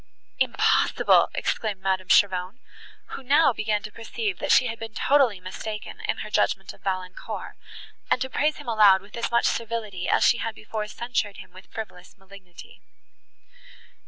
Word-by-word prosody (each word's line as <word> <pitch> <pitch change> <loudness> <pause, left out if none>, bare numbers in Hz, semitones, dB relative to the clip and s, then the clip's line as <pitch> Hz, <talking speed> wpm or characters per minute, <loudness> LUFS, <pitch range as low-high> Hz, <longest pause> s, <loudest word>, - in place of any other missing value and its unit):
"Impossible!" - - +3
exclaimed 210 -4 -2
Madame 190 -1 -1
Cheron, 185 +2 +3 0.5
who - - -7
now 280 +2 +4
began 210 -1 -1
to 215 - -7
perceive, 390 - -4
that 290 - -1
she - - +6
had 230 -2 -4
been 225 -1 -8
totally 265 -8 +3
mistaken 210 +4 -7
in - - -1
her - - -8
judgment 195 -1 0
of - - -21
Valancourt, 185 -1 -5 0.5
and - - +3
to 260 - -1
praise 300 +3 0
him 295 - -11
aloud 205 -4 +5
with 200 - -13
as 235 - -2
much 235 0 +2
servility, 220 -5 -2
as - - +3
she 240 - +4
had 225 -1 -3
before 215 0 -5
censured 220 -2 -3
him - - -12
with 185 +1 -15
frivolous 195 -5 -9
malignity. 195 -2 -15
215 Hz, 160 wpm, -25 LUFS, 190-235 Hz, 0.5 s, she